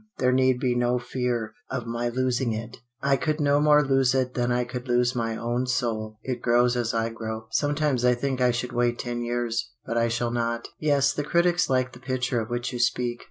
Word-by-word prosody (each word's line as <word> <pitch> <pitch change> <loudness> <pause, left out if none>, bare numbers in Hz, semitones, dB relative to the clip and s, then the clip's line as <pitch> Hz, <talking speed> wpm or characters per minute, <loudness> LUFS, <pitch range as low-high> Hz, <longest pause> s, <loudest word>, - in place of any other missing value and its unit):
There 125 0 +2
need 130 -1 +3
be 125 -1 +1
no 120 0 +1
fear 120 -2 -2 0.2
of 125 -3 -3
my 120 +1 -2
losing 125 -1 0
it. 115 +1 -6 0.3
I 140 0 +3
could 150 +5 -1
no 145 -1 +3
more 150 0 +5
lose 135 -1 +2
it 130 -1 0
than 120 0 0
I 125 0 +1
could 125 +1 -6
lose 120 0 +2
my 115 -2 -1
own 120 +2 -1
soul. 110 -4 -2
It 125 -2 -3
grows 120 +1 +3
as 120 -1 0
I 115 0 0
grow. 110 -1 -6
Sometimes 145 0 +1
I 125 0 +4
think 130 +1 -2
I 125 - +4
should 120 +1 -2
wait 120 0 +1
ten 120 -1 -3
years 120 0 -2
but 115 +1 -1
I 115 - +2
shall 120 +1 -1
not. 115 0 -2
"Yes, 140 -2 +2
the 145 - -2
critics 175 +3 +2
like 130 -1 +1
the 125 - -12
picture 130 -2 -1
of 110 - -6
which 120 +1 -3
you 120 - -4
speak. 120 0 0
125 Hz, 220 wpm, -26 LUFS, 120-130 Hz, 0.3 s, more